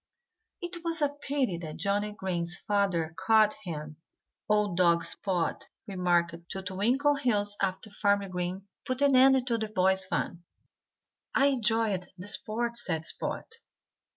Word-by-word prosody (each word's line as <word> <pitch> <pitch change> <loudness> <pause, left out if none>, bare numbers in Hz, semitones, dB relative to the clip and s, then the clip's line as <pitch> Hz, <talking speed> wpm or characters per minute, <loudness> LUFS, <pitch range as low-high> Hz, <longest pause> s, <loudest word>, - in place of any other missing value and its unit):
"It 345 -1 -6
was 330 -2 -1
a 290 - +3
pity 280 - -2
that 155 -3 -7
Johnnie 205 +1 -1
Green's 175 -3 -1
father 195 -6 0
caught 215 +1 +5
him," 150 -3 -6 0.5
old 210 -3 +2
dog 170 -2 +3
Spot 175 0 -2 0.2
remarked 175 -4 +1 0.2
to 190 - -5
Twinkleheels 215 +1 +1
after 195 +2 -2
Farmer 200 -1 +1
Green 185 +1 -4 0.2
put 255 +2 -1
an 280 -2 +4
end 265 0 +6
to 235 -2 0
the 220 - -2
boys' 190 -2 +2
fun. 175 -2 -3 0.9
"I 275 - +4
enjoyed 225 -6 0
the 180 - -8
sport," 235 +3 +1
said 165 -9 -1
Spot. - - -1
200 Hz, 135 wpm, -29 LUFS, 180-235 Hz, 0.9 s, end